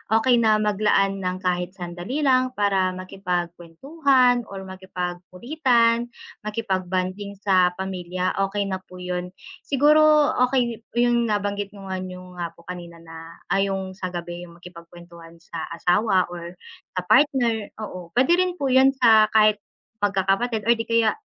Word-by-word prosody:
okey 240 Hz, +1 st, +4 dB
na 220 Hz, -2 st, +4 dB
mag-laan 205 Hz, -2 st, +1 dB
ng 185 Hz, 0 st, -4 dB
kahit 180 Hz, 0 st, -1 dB
sandali 180 Hz, -, -5 dB
lang 255 Hz, -1 st, +2 dB
para 195 Hz, -3 st, +1 dB
maki-pagkwentuhan 195 Hz, -, 0 dB
or 195 Hz, -1 st, -8 dB
makipag-kulitan, 195 Hz, -, -1 dB, 0.3 s
makipag-bonding 195 Hz, -2 st, -3 dB
sa 185 Hz, -3 st, +2 dB
pamilya. 185 Hz, -1 st, -3 dB, 0.2 s
Okay 200 Hz, +1 st, -2 dB
na 190 Hz, -1 st, -3 dB
po 185 Hz, -1 st, -17 dB
'yun 180 Hz, 0 st, -5 dB, 0.2 s
siguro, 300 Hz, +2 st, +4 dB
okay 250 Hz, -3 st, +1 dB, 0.2 s
'yun 240 Hz, -1 st, +2 dB
nabanggit 205 Hz, -1 st, -2 dB
ko 195 Hz, -, -11 dB
nga 185 Hz, -, -2 dB
'yung 180 Hz, -1 st, -9 dB
nga 170 Hz, -, -2 dB
po. 170 Hz, -, -19 dB
Kanina 175 Hz, -1 st, -8 dB
na 165 Hz, 0 st, -11 dB, 0.2 s
ay 195 Hz, 0 st, +2 dB
'yung 190 Hz, -1 st, -3 dB
sa 185 Hz, -1 st, -5 dB
gabi 175 Hz, 0 st, -7 dB
'yung 170 Hz, -, -16 dB
maki-pag-kwentuhan 170 Hz, -1 st, -14 dB
sa 165 Hz, -1 st, -8 dB
asawa 185 Hz, +1 st, +1 dB
or 175 Hz, 0 st, -8 dB, 0.4 s
sa 185 Hz, -, 0 dB
partner, 240 Hz, -2 st, +2 dB
oo, 185 Hz, -4 st, -8 dB
pwede 325 Hz, +8 st, +4 dB
rin 365 Hz, -1 st, +1 dB
po 275 Hz, -6 st, -2 dB
'yun 265 Hz, +1 st, +5 dB
sa 220 Hz, -4 st, +5 dB
kahit 215 Hz, -1 st, +5 dB, 0.4 s
mag-kakapatid, 200 Hz, +4 st, +1 dB
o 235 Hz, -, +6 dB
di 225 Hz, -, -4 dB
kaya, 230 Hz, -, +2 dB
195 Hz, 145 wpm, -23 LUFS, 180-235 Hz, 0.4 s, o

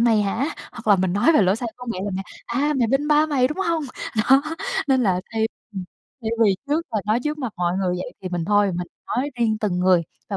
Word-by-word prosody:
mày 225 Hz, -3 st, +4 dB
hả?" 225 Hz, +9 st, 0 dB, 0.2 s
hoặc 230 Hz, -2 st, -11 dB
là 205 Hz, -2 st, +6 dB
mình 185 Hz, -1 st, 0 dB
nói 210 Hz, +12 st, +4 dB
về 220 Hz, -, +5 dB
lỗi 190 Hz, +3 st, +3 dB
sai 235 Hz, 0 st, -3 dB
của 250 Hz, 0 st, -10 dB
mẹ 185 Hz, -, -5 dB
là 205 Hz, -, -2 dB
mẹ: 190 Hz, -, -2 dB, 0.2 s
"À, 285 Hz, +5 st, 0 dB
mày 235 Hz, -, +3 dB
bênh 275 Hz, +4 st, +1 dB
ba 300 Hz, +1 st, +5 dB
mày, 265 Hz, -4 st, +2 dB
đúng 305 Hz, -, -5 dB
hông?" 335 Hz, -4 st, 0 dB, 0.5 s
Đó 270 Hz, +1 st, +7 dB, 0.5 s
nên 260 Hz, -1 st, +4 dB
là 185 Hz, -5 st, +2 dB
thay 220 Hz, 0 st, +1 dB, 0.3 s
ừm, 190 Hz, -2 st, -5 dB, 0.4 s
thay 220 Hz, -, -1 dB
vì 200 Hz, -3 st, +5 dB
trước 305 Hz, +3 st, +1 dB
là 215 Hz, -, +1 dB
nói 220 Hz, +3 st, +2 dB
trước 300 Hz, 0 st, -1 dB
mặt 250 Hz, -6 st, -3 dB
mọi 175 Hz, +1 st, 0 dB
người 185 Hz, -2 st, 0 dB
vậy 180 Hz, -, -5 dB
thì 185 Hz, -, -3 dB
mình 175 Hz, -2 st, -2 dB
thôi, 205 Hz, +1 st, +3 dB
mình 180 Hz, -, -3 dB, 0.2 s
nói 270 Hz, +4 st, -1 dB
riêng 220 Hz, -2 st, +2 dB
từng 190 Hz, -4 st, 0 dB
người 180 Hz, -1 st, +4 dB, 0.3 s
và 200 Hz, -, -2 dB
220 Hz, 255 wpm, -23 LUFS, 190-270 Hz, 0.5 s, Đó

